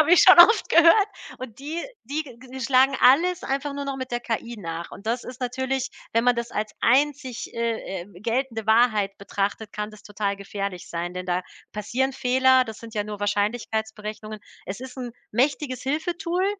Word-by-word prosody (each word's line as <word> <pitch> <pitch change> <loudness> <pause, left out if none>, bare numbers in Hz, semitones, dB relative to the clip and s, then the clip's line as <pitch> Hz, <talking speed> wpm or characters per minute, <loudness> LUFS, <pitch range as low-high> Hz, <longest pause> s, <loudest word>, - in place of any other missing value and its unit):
habe 310 +3 +4
ich 360 - +8
schon 370 -1 +8
oft 415 +4 +8
gehört. 340 +5 +6 0.3
Und 250 -3 -8
die 315 +4 -4 0.2
die 295 +5 -2
g 260 0 -11
schlagen 265 +2 +4
alles 335 +8 +5
einfach 275 +1 -2
nur 280 0 -4
noch 275 -1 -3
mit 260 -1 -6
der 240 0 -1
KI 235 0 -4
nach 170 -2 -6
und 205 - -12
das 240 +2 -1
ist 250 0 -9
natürlich, 260 +1 -2 0.2
wenn 230 +1 +2
man 245 -1 +5
das 235 0 -3
als 215 0 -3
einzig, 260 -1 +1
äh, 230 -5 -2
äh, 175 - -14
geltende 230 -1 -2
Wahrheit 220 -3 +3
betrachtet, 200 +1 -3
kann 210 0 -4
das 215 -1 -15
total 200 -1 -2
gefährlich 200 -2 -5
sein, 170 +1 -4
denn 180 0 -5
da 180 0 0 0.3
passieren 250 +6 -1
Fehler, 260 0 +4
das 220 -3 -8
sind 230 -1 -11
ja 205 -1 -1
nur 210 -1 -7
Wahrscheinlichkeitsberechnungen. 215 0 -2 0.3
Es 195 +5 -5
ist 260 0 -9
'n 245 -2 -5 0.2
mächtiges 260 +1 0
Hilfetool, 340 +6 -1
240 Hz, 185 wpm, -24 LUFS, 210-270 Hz, 0.3 s, ich